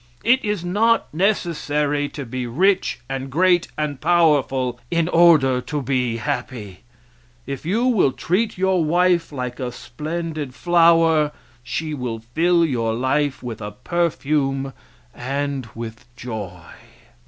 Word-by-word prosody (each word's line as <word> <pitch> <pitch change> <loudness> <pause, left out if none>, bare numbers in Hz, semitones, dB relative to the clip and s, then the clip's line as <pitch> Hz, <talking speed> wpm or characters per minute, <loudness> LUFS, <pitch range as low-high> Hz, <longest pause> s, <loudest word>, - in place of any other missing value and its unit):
It 255 +3 +3
is 210 -4 -2
not 220 +4 +2
necessary 150 -6 0
to 140 -3 -7
be 125 +1 -4
rich 185 +6 +1
and 135 0 -4
great 175 +4 +3
and 150 -3 -3
powerful 140 -7 +2
in 170 -1 +1
order 160 -7 +5
to 150 +3 -3
be 125 -3 0
happy. 115 -7 -4 0.7
If 140 +3 -6
you 225 +7 +1
will 215 - +3
treat 190 - -1
your 190 -2 +2
wife 175 +1 +2
like 125 -2 -5
a 125 -2 -3
splendid 150 +3 -5
flower, 165 -3 +4 0.3
she 155 +5 -4
will 125 -5 -3 0.2
fill 170 +2 +3
your 115 -6 -1
life 130 +2 0
with 115 -3 -6
a 105 - -4
perfume 135 -2 -1 0.4
and 135 -1 -3
with 115 +1 -7
joy. 105 -8 -7
145 Hz, 130 wpm, -21 LUFS, 125-170 Hz, 0.7 s, order